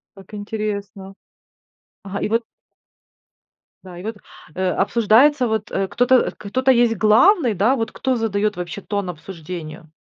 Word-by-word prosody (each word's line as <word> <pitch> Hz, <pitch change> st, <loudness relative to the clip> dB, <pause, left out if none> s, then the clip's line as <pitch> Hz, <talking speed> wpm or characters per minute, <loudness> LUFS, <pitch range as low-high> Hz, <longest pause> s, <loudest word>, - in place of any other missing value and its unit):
Как 195 Hz, +1 st, -16 dB
интересно. 205 Hz, -2 st, -5 dB, 0.9 s
Ага, 200 Hz, 0 st, -5 dB
и -, -, -1 dB
вот 230 Hz, +2 st, +1 dB, 1.4 s
да 180 Hz, -2 st, -11 dB
и 180 Hz, -, -9 dB
вот, 220 Hz, -1 st, -5 dB, 0.4 s
э, 185 Hz, 0 st, -1 dB
обсуждается, 235 Hz, +7 st, +3 dB
вот, 220 Hz, -1 st, -3 dB
э, 195 Hz, 0 st, -1 dB
кто-то 245 Hz, +4 st, +2 dB
э, 255 Hz, -, +3 dB
кто-то 255 Hz, +6 st, 0 dB
есть 240 Hz, -2 st, +3 dB
главный. 230 Hz, -, +4 dB
Да, 220 Hz, +8 st, +2 dB
вот 225 Hz, -2 st, -2 dB
кто 260 Hz, -1 st, -1 dB
задает 210 Hz, -2 st, -1 dB
вообще 175 Hz, -3 st, -6 dB
тон 200 Hz, -3 st, -3 dB
обсуждению. 160 Hz, -2 st, -9 dB
210 Hz, 145 wpm, -20 LUFS, 190-230 Hz, 1.4 s, главный